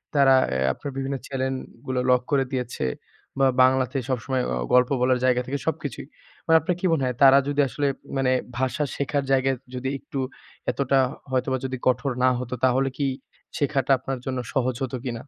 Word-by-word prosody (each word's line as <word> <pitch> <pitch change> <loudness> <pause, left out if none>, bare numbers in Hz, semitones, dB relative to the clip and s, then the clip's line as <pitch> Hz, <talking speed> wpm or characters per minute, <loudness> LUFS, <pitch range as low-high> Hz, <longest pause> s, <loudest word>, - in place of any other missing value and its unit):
তারা 135 -2 +6
অ্যা 65 - -1
আপনার 140 - -7
বিভিন্ন 135 0 -2
চ্যানেল 130 0 -2 0.3
গুলো 130 -1 -1
লক 125 -1 +4
করে 140 -1 +3
দিয়েছে। 125 - -3 0.5
বা 135 - +5 0.2
বাংলাতে 130 +1 +2
সবসময় 130 +1 -1
অ - - 0 0.2
গল্প 125 0 +5
বলার 125 0 +3
জায়গা 125 -1 +3
থেকে, 140 +2 -2
সবকিছুই। 145 -4 -3 0.4
মানে 165 - +4
আপনার 175 +4 -1
কি 185 - -3
মনে 155 -5 +1
হয়, 125 -1 -1
তারা 135 0 +8
যদি 145 0 +2
আসলে 140 +4 -1 0.3
মানে 130 -1 +2 0.3
ভাষা 130 +3 0
শেখার 140 0 -1
জায়গায় 135 0 +2 0.2
যদি 130 +1 -2
একটু 135 - -6 0.5
এতটা 135 0 +1
হ - - -8 0.2
হয়তোবা 130 0 0
যদি 130 0 -3
কঠোর 130 +2 +2
না 130 - +6
হতো, 125 0 -5
তাহলে 130 +2 +2
কি 140 - 0 0.5
শেখাটা 140 -2 0
আপনার 130 0 -4
জন্য 130 -1 -2
সহজ 130 -2 +1
হত 130 - -4
কিনা? 125 -3 -3
130 Hz, 185 wpm, -24 LUFS, 130-140 Hz, 0.5 s, তারা